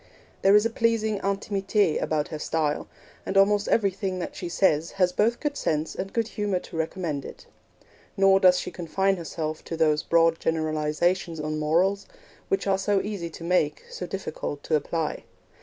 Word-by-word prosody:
There 195 +1 +6
is 210 +1 +5
a 230 - +1
pleasing 225 -2 +1
intimite 200 -2 0
about 150 -1 -1
her 155 - -5
style, 150 -1 -1 0.4
and 195 - -2
almost 205 +1 +4
everything 195 -3 0
that 180 - -5
she 175 - -5
says 165 -3 +2
has 180 -2 +2
both 225 +6 +1
good 295 -2 -2
sense 155 - -1
and 195 +1 -5
good 230 -1 -1
humour 205 -4 -1
to 180 - -9
recommend 160 -3 -2
it. - - -10 0.7
Nor 195 0 +5
does 180 -1 +5
she - - -5
confine 190 +3 0
herself 155 -2 -4
to 165 - -5
those 155 -2 +3
broad 165 -1 +3
generalisations 160 +2 0
on 155 0 -2
morals, 180 +6 +1 0.4
which 390 -1 0
are 195 -1 +2
so 200 0 +2
easy 195 -4 -4
to 165 - -10
make, 170 -4 +1
so 180 - -5
difficult 155 -6 -5
to 160 - +1
apply. 160 +1 -2
180 Hz, 175 wpm, -26 LUFS, 160-200 Hz, 0.7 s, There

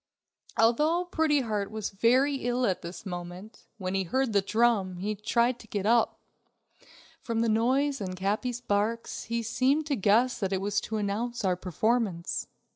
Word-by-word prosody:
Although 300 +10 +3
Pretty 315 -4 +2
Heart 210 -4 -2
was 215 -1 -4
very 255 +7 +3
ill 245 0 0
at 190 -5 0
this 170 +3 -8
moment, 180 +3 -8
when 185 -2 -3
he 195 - +1
heard 260 +5 0
the 200 - +4
drum, 210 -3 +1
he 205 +4 -2
tried 235 +4 +1
to 220 - -14
get 205 -2 -3
up. 230 +1 +3 1.0
From 230 -1 -2
the 230 - +2
noise 260 +5 +1
and 185 -2 -4
Capi's 215 +6 -1
barks, 225 +1 -1
he 235 0 -2
seemed 265 +7 +1
to 290 -2 0
guess 225 +4 +3
that 195 -3 -1
it 190 - +1
was 200 +1 0
to 220 - -4
announce 215 +3 -2
our 185 -1 +2
performance. 185 0 -1
225 Hz, 170 wpm, -28 LUFS, 195-245 Hz, 1.0 s, the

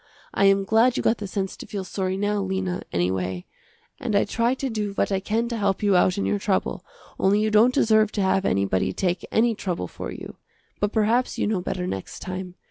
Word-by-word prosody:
I 200 - +3
am 195 0 +4
glad 225 +5 +3
you - - -1
got 225 - +2
the 205 - -4
sense 190 0 -3
to - - -10
feel 200 -2 -4
sorry 185 0 -2
now, 205 +1 0
Lena, 190 -1 -2
anyway, 90 0 -1 0.5
and 225 -4 -2
I 200 - +4
try 235 +4 +1
to 270 - -3
do 210 -4 -3
what 200 - 0
I 195 - +1
can 220 +4 -1
to 235 - -3
help 200 -1 0
you 200 -2 +4
out 180 +1 +3
in 200 - -1
your 205 - 0
trouble, 195 -2 -1 0.4
only 200 +2 +3
you 215 0 +1
don't 220 +4 +5
deserve 220 -3 +3
to 205 - -1
have 190 0 +2
anybody 95 - +1
take 180 - -1
any 230 +1 +3
trouble 180 - -3
for - - -7
you. - - -9 0.4
But 205 0 0
perhaps 225 +3 +1
you - - 0
know 210 -3 0
better 180 0 -3
next 95 - -5
time. 185 -1 -6
200 Hz, 220 wpm, -24 LUFS, 185-215 Hz, 0.5 s, don't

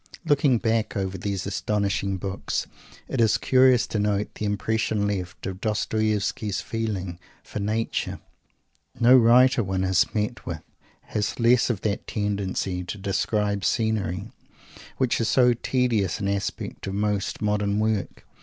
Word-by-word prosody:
Looking 145 -4 +3
back 110 -2 0
over 95 -1 -2
these 95 -1 -3
astonishing 100 0 -1
books, 95 +1 -3 0.4
it - - -1
is 110 -2 +4
curious 130 -2 +4
to 110 - -3
note 105 0 0
the 105 - -4
impression 105 0 0
left 95 -3 -3
of 95 0 -5
Dostoievsky's 105 -1 0
feeling 100 -6 -3 0.2
for - - -6
"Nature." 110 +3 -2 0.8
No 120 +2 +7
writer 125 +1 +6
one 95 -1 -1
has 95 -2 +2
met 105 +3 -2
with 85 -3 -6 0.4
has 105 +3 -3
less 120 +1 +4
of 110 -5 -1
that 105 -2 -2
tendency 100 -3 -2
to 90 +4 -6
"describe 100 +1 -1
scenery," 105 -3 -1 0.7
which 130 -3 +1
is 115 - +1
so 125 -2 +5
tedious 120 -6 0
an 100 - -2
aspect 100 0 -3
of 95 - -3
most 105 -1 -1
modern 105 -1 0
work. 110 -2 -1
105 Hz, 140 wpm, -25 LUFS, 100-115 Hz, 0.8 s, No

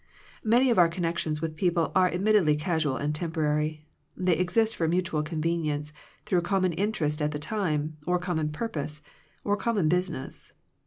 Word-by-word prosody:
Many 240 +4 +4
of 230 - +3
our 175 - +7
connections 165 -3 -2
with 160 -1 -3
people 170 0 +1
are 185 -1 +5
admittedly 185 -4 +3
casual 155 -3 0
and 145 +1 -1
temporary. 155 -1 -1 0.3
They 180 -2 +2
exist 215 +6 +1
for 165 - 0
mutual 170 -2 0
convenience 155 -2 -2 0.3
through 180 -2 +2
common 185 0 +1
interest 165 -5 -1
at 150 - +1
the 150 - -3
time, 155 -3 -2
or 180 0 +3
common 175 -4 -1
purpose, 150 -5 -4 0.4
or 205 - +1
common 205 -7 +1
business. 180 -5 -3
165 Hz, 155 wpm, -27 LUFS, 150-185 Hz, 0.4 s, our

